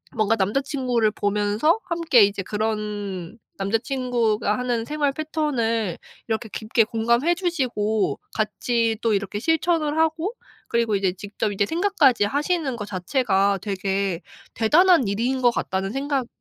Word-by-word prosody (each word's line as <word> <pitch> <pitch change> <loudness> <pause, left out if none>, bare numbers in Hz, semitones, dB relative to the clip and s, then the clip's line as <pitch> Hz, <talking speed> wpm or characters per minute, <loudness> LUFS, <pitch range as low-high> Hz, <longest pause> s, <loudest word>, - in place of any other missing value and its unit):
뭔가 220 0 +2
남자 205 +6 +1
친구를 250 -6 0
보면서 210 - +1
함께 335 - +3
이제 200 0 +1
그런 210 -2 -3 0.2
남자 200 +3 +1
친구가 235 -5 0
하는 240 -2 -1
생활 295 0 0
패턴을 240 - -1 0.3
이렇게 220 0 -2
깊게 220 +1 +1
공감해 235 +9 +1
주시고 245 - -1
같이 225 +1 0
또 225 -2 +2
이렇게 200 0 -2
실천을 320 +2 +1
하고 320 +6 +1 0.3
그리고 230 -3 +1
이제 195 -2 +1
직접 205 +2 -4
이제 200 0 +1
생각까지 325 - +2
하시는 290 - -1
거 210 -3 -5
자체가 200 0 +1
되게 195 -2 -2 0.3
'대단한 310 - +4
일인 240 +6 -1
것 245 - +5
같다.'는 190 -3 -2
생각이 270 -1 -1
230 Hz, 305 characters per minute, -23 LUFS, 205-280 Hz, 0.3 s, 것